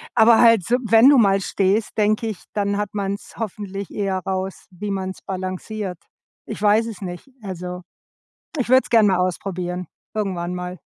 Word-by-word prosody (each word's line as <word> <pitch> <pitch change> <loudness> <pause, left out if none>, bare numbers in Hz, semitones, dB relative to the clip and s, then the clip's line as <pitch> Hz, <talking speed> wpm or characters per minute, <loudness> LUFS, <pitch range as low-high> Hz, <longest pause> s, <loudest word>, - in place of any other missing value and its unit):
aber 225 0 +6
halt 230 -5 +6
so, 240 - +2
wenn 225 +4 +7
du 285 - +6
mal 195 -4 +4
stehst, 200 +3 0
denke 215 +1 +2
ich, 215 -5 -6
dann 200 -1 0
hat 205 0 -2
man's 200 0 -4
hoffentlich 200 -3 -5
eher 195 -2 -2
raus, 190 0 -4
wie 200 +2 -5
man 190 -1 -2
es 190 - -9
balanciert. 185 +1 -4 0.5
Ich - - -7
weiß 210 +2 +4
es 225 -4 -7
nicht, 180 +4 -7
also, 180 -2 -6 0.8
ich 250 -3 -1
würde 260 0 +7
es - - -11
gerne 225 -3 +6
mal 185 -2 +2
ausprobieren, 180 -1 -2 0.3
irgendwann 180 -4 -2
mal. 180 0 -5
195 Hz, 175 wpm, -22 LUFS, 185-215 Hz, 0.8 s, wenn